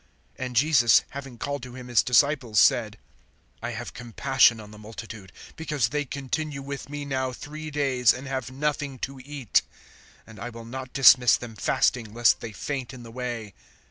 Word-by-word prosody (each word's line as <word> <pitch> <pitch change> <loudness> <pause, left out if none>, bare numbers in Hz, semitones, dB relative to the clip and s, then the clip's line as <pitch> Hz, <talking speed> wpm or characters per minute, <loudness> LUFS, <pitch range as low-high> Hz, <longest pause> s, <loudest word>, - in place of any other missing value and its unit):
(32)And 125 -1 -4
Jesus, 125 -2 +5
having 135 -3 -8
called 140 +3 -3
to 125 0 -9
him 125 -1 -9
his 120 -3 +4
disciples, 125 -4 +3
said: 110 0 +3 0.6
I 115 - -3
have 120 +2 -6
compassion 120 0 +3
on 105 -1 -11
the 105 - -12
multitude, 110 -3 -9 0.2
because 150 -7 -1
they 150 +2 -1
continue 140 +1 -4
with 140 0 -6
me 145 0 -5
now 130 -2 -1
three 155 +4 -8
days, 135 -5 +3
and 130 +3 -6
have 130 -2 -3
nothing 140 0 -2
to 135 0 -12
eat; 140 -5 +1 0.6
and 110 -3 -13
I 120 - -5
will 115 -1 -10
not 130 +2 -7
dismiss 130 -2 +7
them 115 -2 -9
fasting, 110 +1 0
lest 120 0 +4
they 115 - -7
faint 130 +6 -5
in 120 - -11
the 115 - -11
way. 120 -4 -5
125 Hz, 175 wpm, -26 LUFS, 115-140 Hz, 0.6 s, dismiss